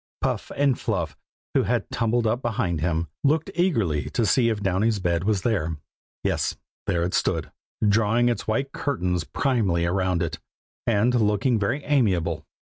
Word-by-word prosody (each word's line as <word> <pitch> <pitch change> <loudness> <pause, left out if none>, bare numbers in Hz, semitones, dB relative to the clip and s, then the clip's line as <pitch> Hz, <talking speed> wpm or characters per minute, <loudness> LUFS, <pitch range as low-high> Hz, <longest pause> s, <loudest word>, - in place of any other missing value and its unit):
Puff - - -2
and 140 -3 +2
Fluff, 85 - -2 0.4
who - - +4
had - - 0
tumbled 115 +1 +1
up 115 +3 +1
behind 110 - -1
him, 85 0 0 0.2
looked 155 +2 +2
eagerly 115 - +1
to 115 - 0
see 115 +2 +3
if 110 -2 -1
Downy's 105 +3 +2
bed 85 -2 0
was 100 -3 +1
there. 85 -9 0 0.5
Yes, - - 0 0.3
there 85 -1 +1
it 90 - -2
stood, - - 0 0.4
drawing 115 +3 +3
its 120 - -1
white 135 +6 0
curtains 90 - -1
primly 100 - +1
round 90 -1 +1
it, 85 - -4 0.5
and 115 +2 +3
looking 110 +1 +2
very 120 +9 -1
amiable. 90 - +1
105 Hz, 155 wpm, -25 LUFS, 90-120 Hz, 0.5 s, who